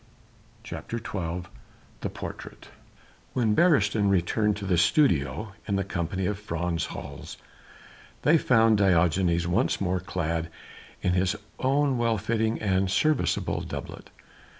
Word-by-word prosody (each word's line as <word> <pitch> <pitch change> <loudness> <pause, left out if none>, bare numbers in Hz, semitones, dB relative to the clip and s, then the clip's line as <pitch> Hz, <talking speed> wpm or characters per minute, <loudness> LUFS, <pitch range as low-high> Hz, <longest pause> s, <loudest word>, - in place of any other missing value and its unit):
CHAPTER 115 - -6
XII 90 -6 -4 0.6
THE - - -3
PORTRAIT - - -9 0.6
When 115 -4 +2
Beresteyn 105 - +3
returned 100 +3 +1
to 100 - -6
the 90 -3 +2
studio 85 - +2
in 100 - 0
the 100 - +1
company 95 0 -3
of 100 +1 -2
Frans 85 -4 -2
Hals - - -8 0.9
they 160 +2 +5
found 115 -5 +4
Diogenes 90 -2 +3
once 90 +9 +1
more 95 -1 0
clad 85 -2 -2 0.5
in 90 - +2
his 95 +2 +1 0.2
own 135 -1 +2
well 115 -1 +2
fitting 110 +2 0
and 95 -2 +1
serviceable 150 +9 +1
doublet. - - -7
100 Hz, 125 wpm, -27 LUFS, 90-115 Hz, 0.9 s, they